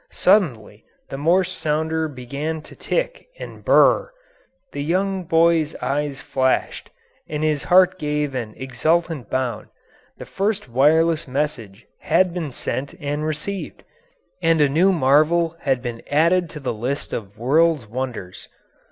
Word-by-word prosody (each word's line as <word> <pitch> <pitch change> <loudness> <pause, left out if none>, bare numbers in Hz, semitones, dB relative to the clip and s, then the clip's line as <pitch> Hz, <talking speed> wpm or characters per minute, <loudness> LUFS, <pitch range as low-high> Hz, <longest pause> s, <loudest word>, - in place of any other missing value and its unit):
Suddenly 115 - +1 0.3
the 135 - -5
Morse 180 +5 +2
sounder 160 -1 -1
began 145 +4 -5
to - - -14
tick - - -3
and - - -9
burr - - +6
r - - +2
r; - - -14 0.6
the 185 +6 -1
boy's 165 -2 +2
eyes 140 0 -2
flashed, 130 -1 -1 0.4
and 150 0 -3
his 155 -2 0
heart 185 +1 +4
gave 150 -1 -1
an 115 -4 -5
exultant 155 0 -1
bound 130 -2 -2 0.5
the - - -9
first 205 -1 -2
wireless 155 +6 +3
message 125 -7 -3
had 175 +2 +2
been 170 -4 -3
sent 135 +2 -4
and 145 +1 -3
received, 155 +6 -5 0.6
and 165 -1 +3
a 145 - +5
new 175 +7 +3
marvel 160 +2 +3
had 130 -3 -1
been 120 -2 -5
added 170 +4 +2
to 150 - -8
the 130 -4 -3
list 125 +6 -4
of 100 -2 -6
world's 150 +2 +2
wonders. 110 -6 -6
150 Hz, 140 wpm, -21 LUFS, 130-170 Hz, 0.6 s, burr